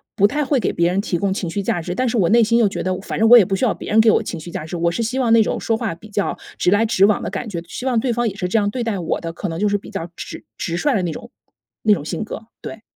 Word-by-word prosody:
不 200 - +4
太 295 +7 -1
会 270 -2 +1
给 195 - 0
别 170 0 +2
人 185 +2 0
提 190 -4 -2
供 200 -1 0
情 180 -4 -3
绪 200 +4 -2
价 195 -3 -1
值， 175 +2 -4
但 255 +7 0
是 235 - -1
我 180 -6 +3
内 235 +2 +5
心 230 +2 +2
又 230 -3 +4
觉 195 - -4
得， 185 0 -1
反 - - -5
正 225 - +4
我 245 - +10
也 220 - +7
不 195 - -1
需 195 - 0
要 225 - +2
别 - - -8
人 220 - +5
给 220 - +5
我 - - +2
情 170 - -5
绪 165 +3 -9
价 155 - -5
值。 160 - -6
我 170 0 +1
是 230 +7 -2
希 250 +4 -2
望 245 -3 +1
那 225 - +6
种 - - -2
说 225 - 0
话 225 -6 -2
比 215 +6 -14
较 205 -1 -1 0.2
直 180 - +2
来 215 +3 +3
直 195 -3 +4
往 210 0 +2
的 - - -3
感 240 - -5
觉， 170 -3 -4
希 250 - -7
望 245 -3 +2
对 245 +1 0
方 240 0 0
也 205 - -2
是 185 -3 -2
这 225 - +1
样 205 -2 +2
对 240 +3 -3
待 220 -4 -2
我 165 - -2
的， 165 -1 -5
可 200 - -4
能 165 +1 -4
就 210 - +2
是 205 - +1
比 200 - -12
较 175 -4 -5
直 - - -8
直 170 0 -3
率 280 +5 +1
的 190 - 0
那 170 - -1
种 235 - -9 0.5
那 215 - +5
种 190 - -2
性 215 - -3
格， 220 +1 -8
对。 220 - -8
205 Hz, 375 characters per minute, -20 LUFS, 180-230 Hz, 0.5 s, 我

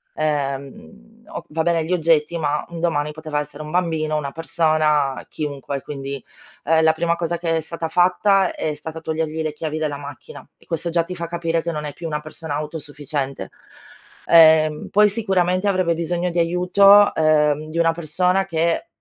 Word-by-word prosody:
ehm, 140 - -4
o - - -7
va 160 +1 -1
bene 170 -1 +1
gli 175 - -1
oggetti, 165 -1 +2
ma 150 -2 -1
un 170 -1 -7
domani 150 -3 0
poteva 155 -1 -4
essere 150 +1 -7
un 150 - -8
bambino, 160 -3 0
una 140 -2 -3
persona, 155 -3 +1
chiunque. 140 -2 -5
Quindi, 140 -1 -6 0.4
ehm, 160 +1 +3
la 160 - +6
prima 170 +1 0
cosa 170 0 -2
che 165 -1 -1
è - - +1
stata 165 +1 -5
fatta 185 +3 +3
è 155 - -3
stata 155 +2 -8
togliergli 160 0 -3
le 155 -1 -3
chiavi 155 0 -4
della 150 -2 -2
macchina 145 -1 -10
e - - -24
questo 170 0 -3
già 170 0 +1
ti 180 +2 -7
fa 170 -1 -4
capire 165 -1 -1
che 170 - -3
non 150 -2 -4
è 145 - -5
più 170 - -10
una 150 -1 -2
persona 155 0 -6
autosufficiente. 145 -2 -5 0.8
Ehm, 155 -2 +5
poi, 210 +1 +5
sicuramente, 190 -3 0
avrebbe 185 -3 +1
bisogno 170 +2 -2
di 170 - -5
aiuto, 190 +4 +5
uhm, 155 -1 +2
di 160 - -6
una 165 -1 +3
persona 180 +4 0
che 170 - -1
160 Hz, 180 wpm, -21 LUFS, 150-170 Hz, 0.8 s, la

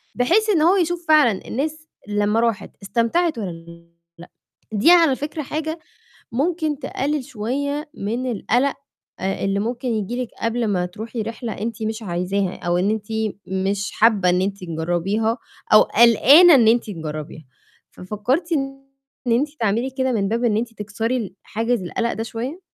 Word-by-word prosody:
بحيث 380 - +2
إن 340 -7 +3
هو 360 +4 +5
يشوف 345 -1 -1
فعلًا 290 -10 +4
الناس 310 +4 -3 0.2
لمّا 205 +2 +1
راحت 225 -4 -1
استمتعت 240 - +1
والّا 170 -3 -8 0.3
لأ. 175 - -12 0.4
دي 215 +12 +5
على 330 -6 +6
فكرة 305 +3 -5
حاجة 315 +3 -4 0.5
ممكن 310 +2 0
تقلِّل 275 +1 -2
شوية 285 +7 -3
من 240 +5 -3
القَلق 245 +6 +1 0.5
آآ 195 +1 -2
اللي 195 0 0
ممكن 240 +3 -3
ييجي 230 +3 -2
لِك 240 - -6
قبل 230 0 0
ما 180 -3 0
تروحي 220 +5 -6
رِحلة 230 +1 -5
أنتِ 225 +2 -5
مش 220 +1 -3
عايزاها 185 +1 -2
أو 175 0 -1
إن 195 +3 +1
أنتِ 215 -1 -2 0.4
مش 195 +1 -1
حابّة 210 -5 +3
إن 180 +1 +2
أنتِ 200 0 -3
تجرَّبيها 175 +8 -1 0.4
أو 215 - +9
قَلقانة 275 - +7
إن 230 -4 +5
أنتِ 235 +1 +3
تجرَّبيها. 155 -3 -6 0.5
ففكرتِ 245 - -2
إن 270 -2 -2 0.5
أنتِ 275 +6 +2
تعملي 230 +5 0
كده 260 -1 -1
من 200 -3 0
باب 235 +2 -1
إن 215 -3 +2
أنتِ 230 +1 -2
تكسري 220 +4 -2
ال 210 -6 -4
حاجز 230 -1 -1
القَلق 235 +6 -2
ده 225 - -3
شوية؟ 255 +10 -5
230 Hz, 160 wpm, -21 LUFS, 200-270 Hz, 0.5 s, أو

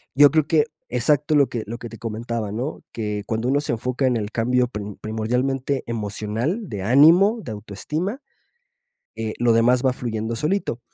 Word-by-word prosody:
yo 145 0 +7
creo 155 -2 +2
que 155 -2 +3 0.2
exacto 145 +5 +1
lo 140 -2 +5
que 115 -3 -4
lo 115 +3 -6
que 120 - -8
te 115 - -10
comentaba, 115 -1 -4
¿no?, 125 +8 -4
que 105 -2 -3
cuando 115 +2 -2
uno 140 +2 +2
se - - -2
enfoca 125 +3 -1
en 125 -2 +2
el 105 0 -4
cambio 125 +2 +1
pri 105 -4 -6 0.2
primordialmente 125 +5 -1
emocional, 110 - -2
de 100 -3 -5
ánimo, 165 - +6
de 110 - -6
autoestima, 150 - -4 0.9
eh, 110 -1 -4
lo 120 -1 +3
demás 120 +3 +3
va 130 - +4
fluyendo 115 -2 -3
solito. 150 - -1
120 Hz, 175 wpm, -23 LUFS, 110-140 Hz, 0.9 s, yo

